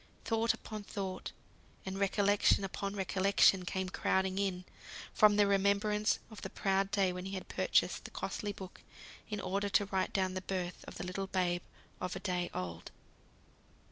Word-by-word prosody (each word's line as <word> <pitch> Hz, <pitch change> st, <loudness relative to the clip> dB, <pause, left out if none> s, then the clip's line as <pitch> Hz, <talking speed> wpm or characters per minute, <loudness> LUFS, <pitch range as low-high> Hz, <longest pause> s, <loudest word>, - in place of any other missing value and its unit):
Thought 225 Hz, 0 st, +2 dB
upon 215 Hz, -1 st, -7 dB
thought, 195 Hz, -2 st, -5 dB, 0.5 s
and 190 Hz, 0 st, -4 dB
recollection 200 Hz, 0 st, +3 dB
upon 195 Hz, +1 st, -3 dB
recollection 195 Hz, -1 st, +3 dB
came 190 Hz, +1 st, -2 dB
crowding 190 Hz, +1 st, 0 dB
in, 185 Hz, -2 st, -1 dB, 0.5 s
from 210 Hz, -1 st, +6 dB
the 205 Hz, 0 st, +5 dB
remembrance 200 Hz, +2 st, +2 dB
of 220 Hz, -, -10 dB
the 195 Hz, -, -5 dB
proud 195 Hz, 0 st, +1 dB
day 195 Hz, -2 st, +2 dB
when 180 Hz, 0 st, -5 dB
he 195 Hz, -, -6 dB
had 185 Hz, -, -6 dB
purchased -, -, +1 dB
the -, -, -6 dB
costly 205 Hz, -, -3 dB
book, 190 Hz, -2 st, -10 dB, 0.5 s
in 210 Hz, -1 st, -3 dB
order 200 Hz, +2 st, -1 dB
to 205 Hz, -, +3 dB
write 190 Hz, -1 st, -1 dB
down 185 Hz, -2 st, 0 dB
the 185 Hz, -, -3 dB
birth 185 Hz, -1 st, -4 dB
of -, -, -8 dB
the -, -, -5 dB
little 190 Hz, +2 st, -3 dB
babe 180 Hz, -2 st, 0 dB, 0.4 s
of 180 Hz, 0 st, -2 dB
a -, -, -4 dB
day 180 Hz, -2 st, -1 dB
old. 85 Hz, -2 st, -5 dB
195 Hz, 170 wpm, -33 LUFS, 185-200 Hz, 0.5 s, from